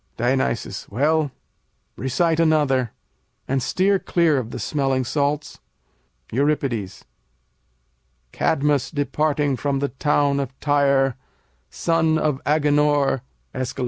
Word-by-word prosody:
Dion. 125 +3 +1 0.5
Well, 145 +6 +1 0.6
recite 160 +6 0
another, 145 -6 +2 0.6
and 135 0 0
steer 190 +9 +2
clear 165 -7 +2
of 115 -3 -5
the - - -6
smelling 135 -3 -1
salts. 145 +3 -1 0.7
Eur. 145 +5 +2 1.7
Cadmus 145 -1 +1
departing 145 -1 0
from 140 0 -1
the 140 +1 -1
town 145 0 +1
of 135 -1 -5
Tyre, 140 -3 +2 0.5
Son 160 -1 +1
of 150 -3 0
Agenor 145 -2 +2 0.3
Æsch. 130 -2 -4
145 Hz, 100 wpm, -22 LUFS, 135-150 Hz, 1.7 s, another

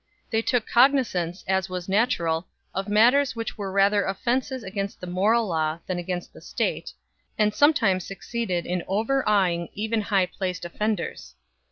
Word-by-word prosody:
They 225 -1 +2
took 235 -1 0
cognizance, 235 -9 +2
as 190 0 0
was 180 -1 -5
natural, 185 -6 +1 0.3
of 195 +2 -3
matters 245 +6 +4
which 230 -1 -4
were 200 -3 -5
rather 200 +1 +3
offences 245 +6 -1
against 195 0 -4
the - - -7
moral 205 +6 +2
law 160 -2 0
than 185 -1 -2
against 175 0 -4
the - - -14
state, - - -2 0.5
and 210 -1 +2
sometimes 225 - +3
succeeded 195 -3 -3
in 180 0 -1
overawing 200 -6 +1
even 220 +2 -1
high 200 -2 +2
placed 180 -1 -4
offenders. 210 +5 -3
200 Hz, 150 wpm, -25 LUFS, 180-225 Hz, 0.5 s, matters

